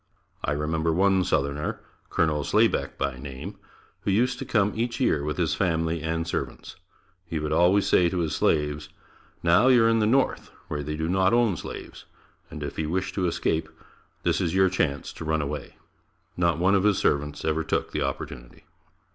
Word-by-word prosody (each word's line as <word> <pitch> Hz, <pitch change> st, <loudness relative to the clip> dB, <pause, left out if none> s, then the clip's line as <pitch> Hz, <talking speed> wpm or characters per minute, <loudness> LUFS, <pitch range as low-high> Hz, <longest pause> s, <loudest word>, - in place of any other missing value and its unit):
I -, -, 0 dB
remember 80 Hz, +2 st, 0 dB
one 95 Hz, +2 st, +3 dB
southerner, 70 Hz, -1 st, -1 dB, 0.3 s
Colonel 75 Hz, -3 st, +1 dB
Slaybeck, -, -, +1 dB
by 65 Hz, -3 st, -2 dB
name, 65 Hz, -1 st, -8 dB, 0.4 s
who -, -, -3 dB
used 125 Hz, +6 st, +2 dB
to -, -, -4 dB
come 105 Hz, -2 st, +2 dB
each 120 Hz, +1 st, -2 dB
year 75 Hz, -, +2 dB
with 75 Hz, 0 st, -3 dB
his -, -, +1 dB
family 80 Hz, -2 st, 0 dB
and 80 Hz, +1 st, -2 dB
servants. 85 Hz, -, -5 dB, 0.5 s
He 85 Hz, -, -3 dB
would 75 Hz, 0 st, -3 dB
always 95 Hz, +3 st, +4 dB
say 90 Hz, -1 st, +4 dB
to 90 Hz, -, -3 dB
his 80 Hz, -3 st, -1 dB
slaves, 75 Hz, -1 st, 0 dB, 0.5 s
"Now 90 Hz, +8 st, +5 dB
you 125 Hz, -3 st, +6 dB
are -, -, +5 dB
in 115 Hz, 0 st, +3 dB
the 105 Hz, -, +2 dB
north 130 Hz, +4 st, +1 dB, 0.2 s
where 75 Hz, -1 st, -2 dB
they 75 Hz, +2 st, -4 dB
do 80 Hz, +1 st, -1 dB
not 95 Hz, +2 st, +2 dB
own 120 Hz, -5 st, +3 dB
slaves, -, -, -8 dB, 0.4 s
and -, -, -7 dB
if -, -, -5 dB
you 75 Hz, -1 st, -1 dB
wish 95 Hz, +3 st, -2 dB
to 95 Hz, -3 st, 0 dB
escape, 80 Hz, -1 st, -1 dB, 0.5 s
this -, -, +1 dB
is 85 Hz, 0 st, -1 dB
your 95 Hz, 0 st, +5 dB
chance 70 Hz, -7 st, -1 dB
to -, -, -8 dB
run 80 Hz, 0 st, 0 dB
away." 75 Hz, 0 st, -5 dB, 0.6 s
Not 85 Hz, -1 st, +1 dB
one 95 Hz, +3 st, +3 dB
of 100 Hz, -1 st, +3 dB
his 105 Hz, -2 st, +3 dB
servants 75 Hz, +1 st, 0 dB
ever 80 Hz, 0 st, 0 dB
took -, -, -1 dB
the -, -, -2 dB
opportunity. -, -, -5 dB
80 Hz, 190 wpm, -26 LUFS, 75-95 Hz, 0.6 s, you